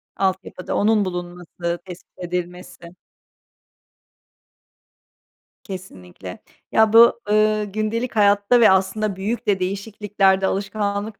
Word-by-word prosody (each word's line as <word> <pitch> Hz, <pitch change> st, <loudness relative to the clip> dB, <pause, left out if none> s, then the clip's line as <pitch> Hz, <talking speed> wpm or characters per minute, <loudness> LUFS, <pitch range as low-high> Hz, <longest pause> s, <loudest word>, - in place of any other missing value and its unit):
Altyapıda 190 Hz, -1 st, -3 dB
onun 210 Hz, -1 st, +2 dB
bulunması, 175 Hz, -1 st, -5 dB
tespit 180 Hz, 0 st, -13 dB
edilmesi. 180 Hz, 0 st, -7 dB, 2.7 s
Kesinlikle. 95 Hz, -, -10 dB, 0.3 s
Ya, 220 Hz, 0 st, +3 dB
bu, 235 Hz, +1 st, +7 dB
ııı, 215 Hz, 0 st, +2 dB
gündelik 215 Hz, +4 st, -3 dB
hayatta 205 Hz, +3 st, +3 dB
ve 225 Hz, -, +6 dB
aslında 190 Hz, +2 st, 0 dB
büyük 210 Hz, +6 st, -4 dB
de 195 Hz, -2 st, +2 dB
değişikliklerde, 195 Hz, 0 st, 0 dB
alışkanlık 200 Hz, +1 st, -3 dB
195 Hz, 90 wpm, -21 LUFS, 180-215 Hz, 2.7 s, bu